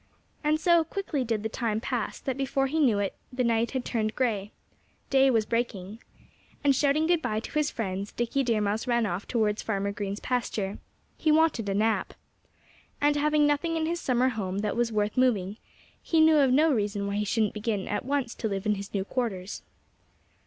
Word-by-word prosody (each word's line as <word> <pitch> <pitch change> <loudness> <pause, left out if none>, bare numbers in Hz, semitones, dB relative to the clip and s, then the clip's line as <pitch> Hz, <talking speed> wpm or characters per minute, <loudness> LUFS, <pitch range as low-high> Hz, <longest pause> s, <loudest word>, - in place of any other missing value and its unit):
And 305 +1 +2
so 340 0 +4
quickly 320 -5 -3
did 225 -3 -2
the - - 0
time 220 -1 -2
pass 235 -1 -3
that 265 - -2
before 270 0 0
he 305 +4 -1
knew 245 -9 +4
it 200 -1 -1 0.2
the 250 0 -1
night 230 0 +2
had 260 -2 -3
turned 215 -2 -1
gray. 215 -5 -1 0.6
Day 270 0 +5
was 225 -4 +2
breaking. 220 -3 -3 0.6
And 280 -2 +4
shouting 290 +3 +2
good 340 0 +2
bye 215 -7 -1
to - - -8
his 300 -1 +1
friends 195 -2 -4
Dickie 240 +4 -1
Deer 230 -5 +1
Mouse 210 +3 -1
ran 235 -2 +2
off 180 0 -3
towards 215 -3 0
Farmer 200 -2 -1
Green's 200 0 -4
pasture. 220 -5 -2 0.4
He 310 - +2
wanted 305 -9 +3
a 195 - 0
nap. 220 +2 0 0.8
And 290 0 +3
having 300 0 +3
nothing 310 +3 +1
in 320 - 0
his 340 +2 -1
summer 255 0 +2
home 200 -4 -3
that 210 -1 -1
was 235 -1 +1
worth 210 +1 -1
moving, 215 -6 +2 0.4
he 325 - +1
knew 315 0 +6
of 270 -3 +4
no 305 +5 +4
reason 205 -3 -1
why 200 0 -2
he 210 - +1
shouldn't 215 0 0
begin 210 -2 -2
at - - -2
once 270 -2 -1
to 220 - -3
live 195 0 -3
in 210 - +3
his 200 0 -6
new 195 -1 0
quarters. 205 -6 -3
235 Hz, 200 wpm, -27 LUFS, 210-275 Hz, 0.8 s, knew